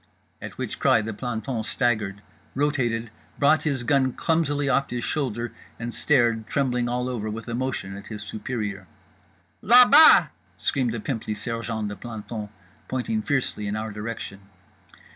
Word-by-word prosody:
_" -, -, -37 dB, 0.4 s
At -, -, -8 dB
which -, -, -4 dB
cry 110 Hz, -, +4 dB
the 110 Hz, +1 st, -4 dB
planton 120 Hz, +2 st, -3 dB
staggered, 110 Hz, -4 st, -1 dB, 0.3 s
rotated, 120 Hz, -6 st, 0 dB, 0.3 s
brought 150 Hz, +2 st, +4 dB
his 135 Hz, -4 st, -2 dB
gun 130 Hz, 0 st, +2 dB
clumsily 145 Hz, -4 st, 0 dB
off 135 Hz, +1 st, +2 dB
his 120 Hz, -1 st, -3 dB
shoulder, 120 Hz, -6 st, -2 dB, 0.2 s
and 115 Hz, 0 st, -5 dB
stared, 120 Hz, -6 st, +2 dB
trembling 125 Hz, -3 st, 0 dB
all 125 Hz, +1 st, -1 dB
over 115 Hz, -4 st, -3 dB
with 115 Hz, +3 st, -6 dB
emotion, 120 Hz, -5 st, -3 dB
at 100 Hz, 0 st, -10 dB
his 105 Hz, -1 st, -6 dB
superior. 105 Hz, -3 st, -5 dB, 0.8 s
"Là 245 Hz, +4 st, +8 dB
bas!" 310 Hz, +2 st, +9 dB, 0.3 s
screamed 130 Hz, -4 st, 0 dB
the -, -, -3 dB
pimply 110 Hz, -2 st, -3 dB
sergeant 115 Hz, -1 st, -3 dB
de 105 Hz, -, -5 dB
plantons, 110 Hz, -2 st, -7 dB, 0.4 s
pointing 215 Hz, -, -1 dB
fiercely 135 Hz, -, -1 dB
in 100 Hz, -, -2 dB
our 110 Hz, 0 st, -3 dB
direction. 105 Hz, -1 st, -6 dB
120 Hz, 150 wpm, -25 LUFS, 110-135 Hz, 0.8 s, bas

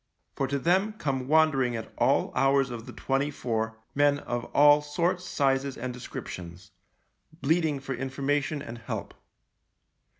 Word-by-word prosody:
For 135 Hz, -, 0 dB
to 140 Hz, +1 st, -1 dB
them 190 Hz, +8 st, +2 dB
come 135 Hz, -10 st, -2 dB
wandering 145 Hz, -5 st, +3 dB
at 110 Hz, -1 st, -6 dB
all -, -, +2 dB
hours 135 Hz, -1 st, +3 dB
of 115 Hz, -1 st, -7 dB
the -, -, -7 dB
twenty 135 Hz, +2 st, -1 dB
four 110 Hz, -5 st, -2 dB, 0.2 s
men 145 Hz, 0 st, +3 dB
of 120 Hz, -4 st, -4 dB
all 145 Hz, +2 st, +6 dB
sorts, 170 Hz, +5 st, -1 dB
sizes, 135 Hz, -4 st, 0 dB
and 125 Hz, +1 st, -4 dB
descriptions, 95 Hz, -5 st, -8 dB, 0.7 s
bleating 155 Hz, -1 st, +2 dB
for 135 Hz, 0 st, -4 dB
information 140 Hz, +3 st, -1 dB
and 115 Hz, +1 st, -8 dB
help. 115 Hz, -, -5 dB
135 Hz, 140 wpm, -28 LUFS, 125-145 Hz, 0.7 s, all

